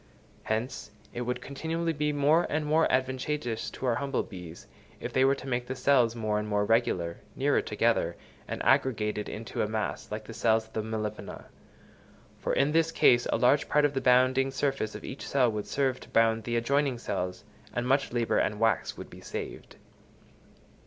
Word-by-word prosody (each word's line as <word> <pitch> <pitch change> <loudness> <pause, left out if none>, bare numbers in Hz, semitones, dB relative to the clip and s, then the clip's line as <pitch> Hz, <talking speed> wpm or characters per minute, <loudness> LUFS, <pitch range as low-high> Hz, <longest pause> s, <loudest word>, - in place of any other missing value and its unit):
Hence, 110 +4 -3 0.2
it 120 - -4
would 125 0 -2
continually 165 +4 -2
be 150 0 0
more 150 +4 +3
and 150 0 -1
more 155 +2 +3
advantageous 130 -2 -1
to - - -7
our 125 - +3
humble 140 +2 -1
bees, 90 -3 -10 0.3
if - - -6
they 130 - +4
were 135 +1 +4
to 135 - -10
make 125 -1 -1
their 130 - -3
cells 125 -3 +3
more 110 -2 0
and 105 - -4
more 105 -1 +1
regular, 95 -7 +1 0.2
nearer 140 +2 +2
together, 105 -5 +1 0.3
and - - -4
aggregated 115 -5 +1
into 110 +1 -4
a - - +1
mass, 110 -1 -3
like 105 +1 -4
the 115 - -9
cells 110 0 +2
of 110 - -23
the 110 - -1
Melipona; 110 -1 -5 0.9
for - - -2
in 140 +2 +2
this 165 +1 +2
case 120 -6 +4
a - - +1
large 130 +5 +3
part 150 0 +4
of 145 - +1
the 135 - -1
bounding 130 +1 +4
surface 135 -4 -1
of - - -8
each 130 - -7
cell 125 -4 +3
would 105 -1 -4
serve 135 -2 0
to - - -14
bound 115 -1 +2
the 120 - -1
adjoining 135 +2 +1
cells, 90 -5 -4 0.3
and 120 +1 -2
much 135 +1 +2
labour 120 -1 +1
and 105 -1 0
wax 110 -2 +1
would - - -9
be - - -12
saved. - - -7
125 Hz, 190 wpm, -29 LUFS, 110-140 Hz, 0.9 s, they